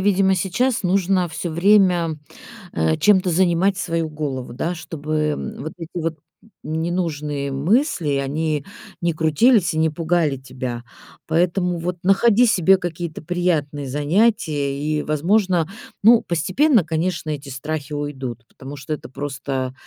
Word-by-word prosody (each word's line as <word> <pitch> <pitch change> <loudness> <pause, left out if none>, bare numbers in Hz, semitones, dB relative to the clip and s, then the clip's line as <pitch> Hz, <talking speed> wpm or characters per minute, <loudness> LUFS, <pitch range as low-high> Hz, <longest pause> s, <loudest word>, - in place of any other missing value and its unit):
видимо, 190 -1 +3
сейчас 215 +7 0
нужно 185 -1 +1
всё 160 +2 -4
время, 175 -3 +3 0.6
э, 80 -1 +1
чем-то 190 -3 +4
занимать 185 +2 +2
свою 165 -4 -1
голову, 135 -5 -4
да, 165 +8 -2
чтобы, 155 -2 -5 0.2
м, - - -6
вот 155 - -6
эти 165 -2 -8
вот 160 -1 -2 0.5
ненужные 155 -3 -2
мысли, 170 - +1
они 150 +2 -1 0.4
не 170 -1 +1
крутились 165 - +3
и - - -3
не 160 - +3
пугали 160 -2 0
тебя. 125 -2 -6 0.4
Поэтому 175 +1 +1
вот 175 +1 -3
находи 210 +5 +4
себе 190 -3 +4
какие-то 170 -3 -5
приятные 155 -5 -1
занятия 145 - +1
и, 150 0 -1
возможно, 175 +2 +1 0.4
ну, 230 +2 +7
постепенно, 185 - +2
конечно, 160 0 -2
эти 140 -1 -6
страхи 150 +2 -5
уйдут, 130 -5 -5
потому 135 +2 -10
что 140 +2 -5
это 145 - -7
просто 135 -1 -4
160 Hz, 135 wpm, -21 LUFS, 145-185 Hz, 0.6 s, ну